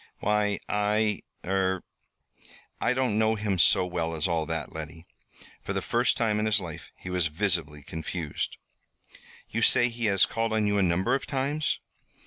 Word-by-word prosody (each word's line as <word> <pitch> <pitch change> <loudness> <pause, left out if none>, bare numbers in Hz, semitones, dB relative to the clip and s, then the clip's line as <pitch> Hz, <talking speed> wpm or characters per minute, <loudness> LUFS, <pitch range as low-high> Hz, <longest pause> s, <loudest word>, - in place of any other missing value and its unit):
"Why, 105 -1 +1
I 105 +1 +1 0.2
er 95 -1 0 1.0
I 120 - +2
don't 125 -5 +1
know 110 0 +3
him 105 -3 -1
so 90 +3 +5
well 85 -2 -2
as 75 +1 +1
all 80 -3 0
that, 80 -2 -4
Letty." 80 +1 -8 0.6
For - - -4
the - - -1
first 120 +1 +2
time 110 -3 +1
in 110 - +1
his 110 -1 +3
life 85 -4 -8
he 90 - -8
was 90 -2 +1
visibly 80 -4 -1
confused. 80 0 -4 0.9
"You - - -1
say 120 0 +5
he 115 0 -4
has 100 -2 +5
called 115 -1 -1
on 110 -1 +2
you 105 0 +2
a - - +3
number 95 +6 +2
of 135 - -1
times?" 140 +2 0
100 Hz, 170 wpm, -27 LUFS, 85-110 Hz, 1.0 s, so